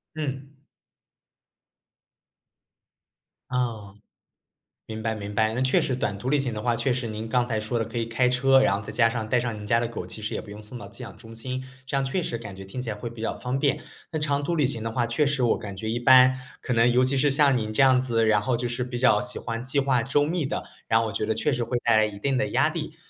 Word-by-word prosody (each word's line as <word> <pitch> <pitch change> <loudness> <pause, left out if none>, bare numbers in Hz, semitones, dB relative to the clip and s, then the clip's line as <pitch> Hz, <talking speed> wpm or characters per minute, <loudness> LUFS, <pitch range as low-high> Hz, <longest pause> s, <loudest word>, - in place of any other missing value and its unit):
嗯。 140 -2 -5 2.9
嗯。 110 -5 -3 0.9
明 110 0 -6
白 110 0 -1
明 105 0 -6
白。 110 +1 +2
那 125 - -1
确 130 0 +3
实 130 - -1
短 100 -5 -2
途 120 - -6
旅 150 - +3
行 130 -4 -1
的 105 - -4
话 120 -1 +1
确 120 +3 0
实 125 -2 -3
您 110 +1 -5
刚 120 +1 +1
才 110 -3 -1
说 115 +2 -2
的 115 - 0
可 115 +2 -6
以 115 - 0
开 120 +2 +2
车， 135 +2 +4
然 115 -7 +3
后 - - -6
再 - - -5
加 115 -2 +3
上 115 -2 -4
带 125 - +3
上 115 -3 -3
您 105 - -8
家 115 +2 +3
的 120 - -1
狗， 110 -6 -6
其 110 +4 -8
实 105 - -4
也 - - -3
不 100 - -14
用 105 +1 -9
送 105 +4 -7
到 105 - -9
寄 100 - -13
养 - - -9
中 115 +1 -12
心。 130 +3 -5 0.2
这 135 - -3
样 135 - +1
确 135 +7 -1
实 115 - -3
感 105 -4 -8
觉 95 0 -9
听 125 +7 -6
起 120 - -5
来 105 - -3
会 115 +3 -6
比 115 -1 -10
较 115 - -2
方 125 +1 -2
便。 140 0 +1 0.3
那 155 - -2
长 145 -1 0
途 175 - -1
旅 150 -6 +2
行 115 -5 -3
的 115 - -3
话 120 +1 0
确 120 +6 +1
实 140 -2 0
我 115 - +3
感 100 -2 -7
觉 110 +2 -4
一 115 - -1
般， 130 +1 +7 0.3
可 125 - -2
能 115 +1 +4
尤 125 +1 +4
其 135 +1 +1
是 140 +1 +3
像 140 -2 +4
您 110 -2 -3
这 110 - +2
样 130 -1 +5
子， 115 -3 +1
然 110 -1 +3
后 120 +2 0
就 120 0 -2
是 120 +1 -2
比 125 0 -5
较 120 -4 +4
喜 105 0 -4
欢 115 0 -4
计 130 +2 0
划 130 -3 +2
周 140 +3 +2
密 165 -1 -1
的， - - -3 0.2
然 115 - +4
后 115 - 0
我 105 - -5
觉 - - -1
得 110 - 0
确 125 +7 0
实 120 -1 -1
会 120 +1 -1
带 115 -2 +5
来 110 0 +5
一 100 -1 -6
定 135 +3 0
的 135 - 0
压 - - +3
力。 - - -5
120 Hz, 295 characters per minute, -25 LUFS, 110-130 Hz, 2.9 s, 般